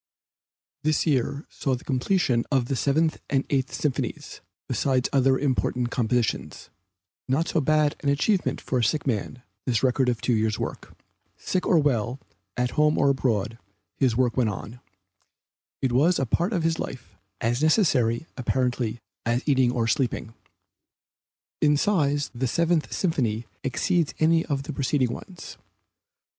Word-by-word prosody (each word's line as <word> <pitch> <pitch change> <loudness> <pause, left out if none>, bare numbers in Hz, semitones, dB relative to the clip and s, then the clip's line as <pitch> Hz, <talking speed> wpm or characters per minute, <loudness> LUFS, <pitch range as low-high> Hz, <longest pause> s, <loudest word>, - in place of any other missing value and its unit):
This 155 +1 +1
year 140 -1 0
saw 135 -2 -2
the 125 - -10
completion 130 -2 +1
of 135 -3 +2
the 135 - -2
Seventh 155 +5 +1
and 135 -1 +1
Eighth 135 -2 +1
Symphonies 145 -4 -3 0.3
besides 130 -2 +1
other 135 -1 +4
important 125 -3 0
compositions; 115 - -1 0.6
not 145 +6 +1
so 160 - +1
bad 150 0 +2
an 145 - 0
achievement 180 +8 +1
for 130 - -1
a - - +1
sick 150 +7 0
man, 125 0 -2 0.2
this 120 -1 +1
record 130 0 +2
of 120 -2 -1
two 125 - 0
years' 110 -1 +1
work. - - -6 0.4
Sick 185 - -2
or 175 - +4
well, 130 -4 +1 0.4
at 125 0 0
home 150 0 +2
or 140 - +4
abroad, 115 -4 -1 0.4
his 125 -5 +1
work 125 -2 +2
went 125 -4 +2
on; 105 +4 -7 1.0
it 130 - +2
was 155 +8 +3
a 135 - 0
part 170 - 0
of 175 -6 0
his 165 0 0
life, 125 -3 -7 0.2
as 120 +3 0
necessary, 155 - +2
apparently, 125 -2 -1 0.2
as 120 +3 0
eating 130 -4 +3
or 120 -2 0
sleeping. 120 -4 -1 1.3
In 150 -1 +4
size 145 -6 +1
the 130 +1 -1
Seventh 170 +4 +1
Symphony 120 - -1 0.2
exceeds 165 +5 0
any 165 +1 +3
of 140 -3 -1
the - - -6
preceding 130 -3 0
ones. 180 +4 -10
135 Hz, 150 wpm, -25 LUFS, 120-150 Hz, 1.3 s, other